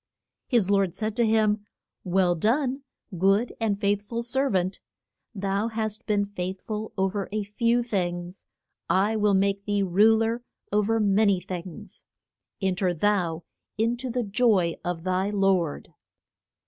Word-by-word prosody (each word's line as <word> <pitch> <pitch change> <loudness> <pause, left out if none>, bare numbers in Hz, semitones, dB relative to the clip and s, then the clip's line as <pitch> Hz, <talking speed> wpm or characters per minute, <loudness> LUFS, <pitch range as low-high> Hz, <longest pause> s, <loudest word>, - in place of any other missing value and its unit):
His 220 -7 +2
lord 195 -3 +2
said 215 -1 -3
to 235 -2 +3
him, 215 -1 +2 0.4
Well 180 -1 +2
done, 255 - 0 0.4
good 195 +6 +3
and 210 -3 0
faith 205 -1 +1
ful 230 +3 -4
ser 265 +3 +1
vant, 185 -2 0 0.6
thou 200 +2 -1
hast 220 0 -4
been 205 -2 +2
faith 190 -2 -5
ful 215 0 -5
o 190 0 +2
ver 200 0 -4
a 215 0 -1
few 230 +4 +1
things, 175 -4 -3 0.4
I 200 +4 +2
will 210 -2 +3
make 200 +1 +1
thee 205 -1 +1
ru 205 +5 +5
ler 225 +2 0 0.3
o 210 +1 +3
ver 225 +2 +1
ma 210 0 +3
ny 200 -3 +3
things; 180 -2 -8 0.6
en 190 -1 +2
ter 180 -1 0
thou 175 -3 0 0.3
in 230 +2 +1
to 255 +1 -5
the 245 +1 -1
joy 200 -5 +2
of 175 -2 -3
thy 185 +2 0
lord. 195 -6 0
205 Hz, 160 wpm, -26 LUFS, 190-220 Hz, 0.6 s, ru